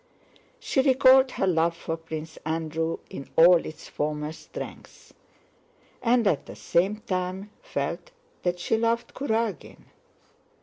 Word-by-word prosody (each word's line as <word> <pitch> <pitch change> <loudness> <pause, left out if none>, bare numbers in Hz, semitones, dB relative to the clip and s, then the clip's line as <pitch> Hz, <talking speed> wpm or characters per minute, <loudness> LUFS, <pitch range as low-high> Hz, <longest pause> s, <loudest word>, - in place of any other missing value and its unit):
She 265 - +1
recalled 265 0 +6
her - - 0
love 170 -2 +2
for 165 - -3
Prince 160 -1 -7
Andrew 160 +1 -2
in 135 - -8
all 170 +1 +7
its 155 - -9
former 150 0 -3
strength, 160 - -10 0.9
and 240 -1 +3
at 160 -8 +1
the - - -9
same 195 +5 0
time 185 +1 -3
felt - - -4 0.3
that 175 0 0
she 220 +5 +1
loved 230 +1 0
Kurágin. 225 - -2
180 Hz, 125 wpm, -26 LUFS, 160-230 Hz, 0.9 s, all